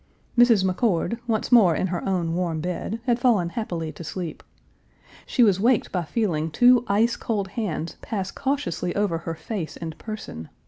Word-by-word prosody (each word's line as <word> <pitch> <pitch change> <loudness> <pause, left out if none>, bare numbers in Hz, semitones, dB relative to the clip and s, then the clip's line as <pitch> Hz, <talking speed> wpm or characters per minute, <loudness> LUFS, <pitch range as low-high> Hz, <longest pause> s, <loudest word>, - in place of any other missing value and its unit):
Mrs. 235 -5 +5
McCord, 190 +3 0
once 220 0 -1
more 200 -9 +6
in - - 0
her 180 -2 -3
own 175 -3 0
warm 170 -2 -1
bed, 180 +6 -3
had 240 -2 +2
fallen 225 -9 +3
happily 170 -6 -4
to 170 - -10
sleep. 170 0 -5 0.9
She 245 - +3
was 200 -4 +4
waked 235 +2 +2
by 180 -3 -1
feeling 165 -6 -1
two 245 +8 +5
ice 220 +4 +2
cold 205 -4 -2
hands 185 -7 -3
pass 195 -4 -3
cautiously 275 - -2
over 200 -5 0
her 165 -1 -5
face 165 +1 -5
and 160 -2 -6
person. 80 - -7
190 Hz, 170 wpm, -24 LUFS, 170-230 Hz, 0.9 s, more